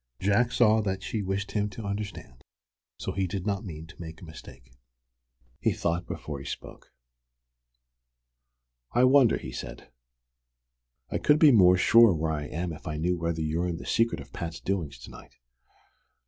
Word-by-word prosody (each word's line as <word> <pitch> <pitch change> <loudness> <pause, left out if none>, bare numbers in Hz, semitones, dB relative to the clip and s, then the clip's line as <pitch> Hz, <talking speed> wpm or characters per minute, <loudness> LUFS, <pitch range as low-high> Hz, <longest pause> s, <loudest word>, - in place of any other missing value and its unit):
Jack 105 +5 +2
saw 110 -3 +4
that 95 -2 -3
she 110 - -3
wished 100 +1 -3
him 105 -1 0
to 105 +2 -8
understand, 100 -4 -5
and 65 - -24 0.5
so - - -4
he 95 -1 -1
did 95 0 -4
not 100 -1 -1
mean 80 -5 -8
to 85 - -14
make 80 -1 -8
a - - -11
mistake. 80 -6 -13 0.9
He - - +1
thought 85 +1 -2
before 75 -3 -6
he 70 - -10
spoke. - - -8 2.0
"I 120 - +4
wonder?" 130 -2 +5
he 65 - -8
said. 60 - -8 1.2
"I - - -1
could 150 - +4
be 155 -2 +7
more 90 -6 +6
sure 115 +1 +6
where 80 0 -1
I 75 -1 -3
am 85 +3 -4
if 75 - -11
I 75 - -3
knew 90 +3 0
whether 85 -1 -2
you're 80 +3 -1
in 85 -2 -3
the - - -9
secret 115 0 +1
of 70 -1 -12
Pat's 85 0 -5
doings 85 -9 -3
to - - -12
night." - - -14
90 Hz, 175 wpm, -27 LUFS, 80-105 Hz, 2.0 s, be